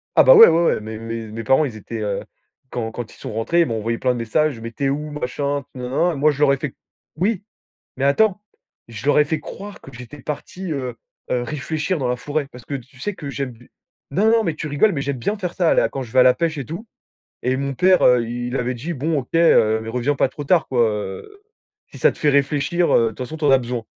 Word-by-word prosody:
Ah - - +7
bah, - - +8
ouais, 455 0 +11
ouais, 170 - +3
ouais. - - +2
Mes 110 +1 -7
mes 115 0 -5
mes 115 +1 -5
parents, 135 +7 +3
ils 125 -6 -5
étaient, 110 +2 -7
heu, 105 -2 -2 0.5
quand 115 -2 -3
quand 115 0 -7
ils - - -18
sont - - -7
rentrés, 115 +11 +1
ils - - +4
m'ont 115 - -2
envoyé 115 +2 -2
plein 125 +1 +1
de - - -4
messages: 120 +4 0
«Mais 115 0 -6
tu 140 +4 -3
es - - +3
où?» 150 +2 -3
machin 140 0 -2
nin-nin 130 +7 0
nin. - - -5
Moi, 150 +2 +3
je 145 - -7
leur 145 -2 +5
ai - - 0
fait 140 -1 -5 0.4
oui, 195 +4 0 0.5
mais 135 - -1
attends, 195 +8 +3 0.5
je 115 +2 -8
leur 145 - +4
ai 150 - +6
fait 155 +1 -2
croire 200 +6 -9
que - - -12
j'étais 125 +4 -11
parti, 165 +6 -5
heu 130 -4 -4 0.3
heu, 125 - +1
réfléchir 150 +6 -2
dans 130 -3 -1
la 125 - 0
forêt. 145 +3 -3
Parce 125 -2 -13
que - - -5
tu 130 0 -9
sais 205 +6 -3
que 145 -5 -7
j'aime 135 -4 -4 0.5
non, 200 +10 +2
non! 230 0 +4
Mais 165 - -1
tu 155 - -5
rigoles, 150 +9 +3
mais 145 - -2
j'aime 140 -1 -3
bien 205 - -1
faire 180 -3 -4
ça, 175 -3 +2
là! - - +3
Quand 135 - -5
je 120 - -10
vais 130 - +1
à - - +8
la 125 0 +6
pêche 165 -2 -1
et 140 - -3
tout. 170 - -7 0.6
Et 130 +1 +1
mon 140 0 -2
père, 185 +6 +4
heu, 125 -2 +5
il 120 +2 -3
avait 125 0 -1
dit: 140 +9 -5
«Bon, 155 +1 -1
OK, 125 - -12
heu, 110 -10 +4
mais 110 - -7
reviens 125 +5 0
pas 135 - +2
trop 145 - -8
tard, 170 +3 +3
quoi. 125 -2 +2
Heu, 105 - -6 0.5
si - - -10
ça - - +4
te - - -17
fait 150 - +3
réfléchir, 145 +5 +1
heu, 115 - +5
de - - +2
toute 110 - -15
façon 130 +5 -5
tu 155 - -5
en 145 - +5
as 135 - +6
besoin». 120 -2 -4
140 Hz, 270 wpm, -21 LUFS, 120-155 Hz, 0.6 s, ouais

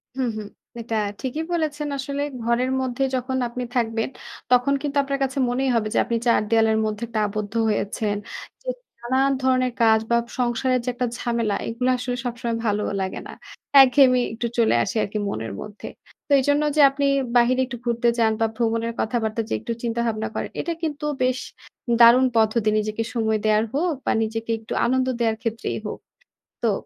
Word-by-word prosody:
হুম, 260 -2 0
হুম। 210 - -6 0.3
এটা 230 0 -4 0.3
ঠিকই 280 +5 -3
বলেছেন। 300 -3 -1
আসলে 280 +1 -3 0.2
ঘরের 235 +2 +1
মধ্যে 260 +1 -1
যখন 260 +1 -2
আপনি 250 +1 -5
থাকবেন, 225 -1 0 0.4
তখন 250 +3 +4
কিন্তু 285 -1 -2
আপনার 275 0 -2
কাছে 270 +1 -2
মনেই 260 +2 0
হবে 215 -2 +1
যে, - - 0
আপনি 235 - 0
৪ 235 - +4
দেয়ালের 225 -1 +3
মধ্যে 215 +1 -3
একটা 220 -1 -2
আবদ্ধ 210 0 -4 0.2
হয়েছেন। 205 0 -1 0.5
যে - - -19 0.3
নানান 260 +3 +1
ধরনের 255 -1 +2
কাজ 220 -1 +5
বা 235 - +4 0.2
সংসারের 250 +1 +1
যে - - 0
একটা 250 0 -1
ঝামেলা, 235 -4 -1
এগুলা 250 +3 0
আসলে 245 0 -3
সবসময় 235 -1 -2
ভালোও 210 -1 0
লাগে 190 0 -3
না। - - -9 0.5
একঘেয়েমি 255 -1 +6
একটু 235 +1 -2
চলে 230 -1 +4
আসি - - -4
আরকি 205 +2 -4
মনের 110 - -4
মধ্যে। 210 0 -9 0.4
তো, 290 - -11
এইজন্য 285 +3 +2
যে 305 - +5
আপনি 280 +1 -1 0.3
বাহিরে 245 +2 +4
একটু 250 -1 -7
ঘুরতে 235 0 +1
যান 225 -1 +4
বা - - +4
ভ্রমণের 230 0 0
কথাবার্তা 220 -1 -1
যে - - -1
একটু - - -5
চিন্তাভাবনা 230 -2 -1
করেন, - - -3
এটা 340 - -2
কিন্তু 300 -2 -3 0.2
বেশ 255 0 +1 0.6
দারুণ 240 +2 +8
পদ্ধতি। 220 0 +3
নিজেকে 215 +1 -1
সময় 220 -2 +1
দেয়ার 215 0 +3
হোক 325 +4 +1
বা - - +2
নিজেকে 225 +1 -3
একটু 220 - -7
আনন্দ 255 +1 +1
দেওয়ার 225 -2 +1
ক্ষেত্রেই 225 - -3
হোক। - - -6 0.7
তো, - - +4
235 Hz, 175 wpm, -23 LUFS, 225-260 Hz, 0.7 s, দারুণ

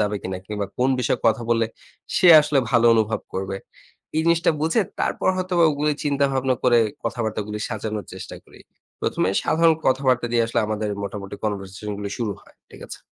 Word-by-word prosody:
যাবে 105 0 0
কিনা, 95 0 -4
কিংবা 105 -2 -3
কোন 125 - +3
বিষয়ে 125 0 0
কথা 110 +1 +2
বললে, 115 -1 +2 0.5
সে 185 -4 +5
আসলে 150 -1 +1
ভালো 120 -2 +3
অনুভব 110 0 +1
করবে। 95 +1 -3 0.6
এই - - +3
জিনিসটা 170 0 +3
বুঝে 165 +8 +2 0.2
তারপর - - 0
হয়তোবা 180 -2 +2
ওগুলি 150 +1 0
চিন্তা 140 -1 +1
ভাবনা 130 -1 +1
করে 120 -2 +5 0.3
কথাবার্তাগুলি 105 -2 -3
সাজানোর 110 -2 -4
চেষ্টা - - -8
করি। - - -18 0.4
১ম - - -1
এ - - -2
সাধারণ 165 0 +4
কথাবার্তা 130 -2 +2
দিয়ে 115 -1 +3
আসলে 115 - 0
আমাদের 110 0 -2
মোটামুটি 100 0 -6
কনভার্সেশন 100 0 -4
গুলি 100 -1 -5
শুরু 110 -4 -1
হয়। - - -22 0.2
ঠিক - - -14
আছে? - - -9
115 Hz, 180 wpm, -23 LUFS, 105-140 Hz, 0.6 s, সে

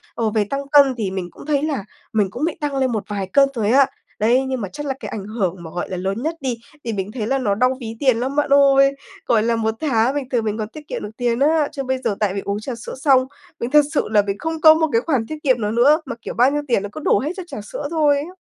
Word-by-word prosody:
Ờ, 225 -2 0
về 215 -1 +1
tăng 275 +6 -4
cân 280 -3 +6
thì 200 -5 -2
mình 185 -2 -4
cũng - - -13
thấy 290 -1 +1
là 285 -9 -1 0.3
mình 210 -3 +2
cũng 255 +7 -5
bị 330 - -2
tăng 290 -2 -2
lên 260 -2 +1
một 215 -3 -2
vài 200 -2 -3
cân 275 -1 +5
rồi 220 -5 -1
á. 270 +3 +6 0.3
Đấy! 240 +5 +3
Nhưng 260 -3 -2
mà 195 - -4
chắc 295 - -6
là 270 - -1
cái - - -6
ảnh 205 -3 -6
hưởng 200 -4 -2
mà, 160 - -9
gọi 175 +1 -4
là, 185 - -4
lớn 195 +7 -3
nhất 320 +1 -1
đi, 255 -3 -2 0.3
thì 230 -2 -3
mình 195 +1 -3
thấy 220 -3 -4
là 270 +3 +1
nó 205 -6 0
đau 255 +3 +2
ví 225 -1 -6
tiền 260 -5 +3
lắm, 260 +3 -2
bạn 295 -1 +1
ơi. 275 -1 +5 0.3
Gọi 220 -2 +3
là, 230 0 +1
1 220 -1 0
tháng 260 -3 +1
bình 275 -3 -3
thường 240 -4 0
mình 215 0 -1
còn 215 -2 -3
tiết 300 +3 -12
kiệm - - -5
được 210 - -5
tiền 240 -1 0
á. 300 +1 +3
Chứ 280 -3 -4
bây 260 0 -1
giờ 210 - -1
tại 205 -3 +1
vì 200 - -3
uống 200 +1 -2
trà 245 +4 -5
sữa 230 - -8
xong, 260 -1 +3 0.3
mình 235 +2 -3
thật 295 -1 +6
sự - - +1
là 215 -1 +4
mình 200 0 -3
không 320 +2 -4
có 315 -1 +9
một 320 0 +1
cái 230 - +3
khoản 265 -6 0
tiết 310 - -5
kiệm 255 -5 +2
nào 210 - -1
nữa 275 +8 +4
mà, 270 - -5
kiểu, - - -6
bao 250 +4 +4
nhiêu 295 0 -1
tiền 235 -5 +1
nó 205 - -5
cứ 310 - -8
đổ - - +3
hết 295 +5 -2
cho 370 - -4
trà 275 -10 -7
sữa 285 +7 -6
thôi 300 -3 +3
á. 370 - -16
255 Hz, 305 wpm, -20 LUFS, 215-280 Hz, 0.3 s, có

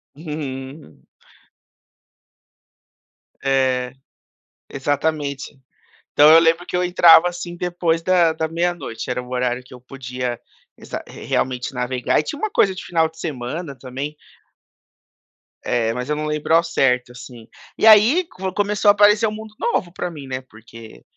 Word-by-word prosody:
Uhum. 145 -2 -8 2.4
É, 130 -2 0 0.8
exatamente. 145 0 -2 0.6
Então 150 +1 +7
eu 165 - +9
lembro 165 +2 +2
que - - -3
eu 180 - +1
entrava 175 -1 +6
assim 175 0 -7
depois 175 -2 -1
da 175 -2 +3
da 160 0 -3
meia-noite, 170 -8 -3
era 125 0 -2
um 125 - -13
horário 125 0 -1
que 125 - -15
eu 125 - -12
podia 125 -2 -6 0.4
exa - - -7
re - - -11
realmente 125 0 -2
navegar 125 0 0
e - - -2
tinha 290 - -6
uma 435 0 -2
coisa 195 - +2
de - - -8
final 165 -2 +1
de 160 0 -20
semana 145 +1 -5
também. 135 +4 -6 1.5
É, 115 -2 0
mas 125 +3 -5
eu 150 - 0
não 150 +1 -3
lembro 150 +1 -1
ao 170 - +4
certo, 125 -6 0
assim. 125 -2 -12 0.3
E 220 - +3
aí, 225 - +6
com 190 - -5
começou 205 0 +1
a - - +10
aparecer 210 +2 +4
o 215 - -3
mundo 215 0 -9
novo 185 - -1
pra 180 -1 -4
mim, 145 -4 -10
né, 130 0 -4
porque 115 -1 -15
150 Hz, 155 wpm, -20 LUFS, 125-175 Hz, 2.4 s, a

